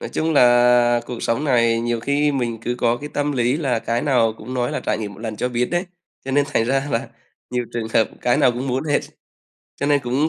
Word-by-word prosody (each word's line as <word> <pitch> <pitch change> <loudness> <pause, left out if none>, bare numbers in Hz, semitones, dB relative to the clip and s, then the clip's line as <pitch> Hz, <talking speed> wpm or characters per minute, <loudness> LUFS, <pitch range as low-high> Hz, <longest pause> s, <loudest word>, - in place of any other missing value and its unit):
Nói - - -5
chung 160 0 0
là 120 -2 +5
cuộc 120 -2 -6
sống 115 +6 0
này 115 -4 +2
nhiều 120 0 -1
khi 145 +4 +1
mình 120 -4 -2
cứ 120 - -2
có 120 0 +2
cái 145 +3 -7
tâm 145 0 0
lý 125 +1 +1
là 135 -7 0
cái 115 +1 -2
nào 120 -6 +2
cũng 125 +4 -7
nói 125 -1 0
là - - -2
trải - - -1
nghiệm 105 -2 -5
một 105 - -14
lần 110 -2 -5
cho 125 - -1
biết 120 0 0
đấy, 175 +2 0 0.4
cho 135 - -4
nên 145 +2 +3
thành 115 - +3
ra 135 +3 0
là 115 - -1 0.4
nhiều 125 -1 -1
trường 115 -2 -3
hợp 110 0 +2
cái 120 - +2
nào 125 - +4
cũng 125 +3 -4
muốn 130 +4 -1
hết, 145 -2 +1 0.8
cho 140 - -2
nên 145 -1 +3
cũng 135 +5 0
125 Hz, 250 wpm, -21 LUFS, 115-140 Hz, 0.8 s, là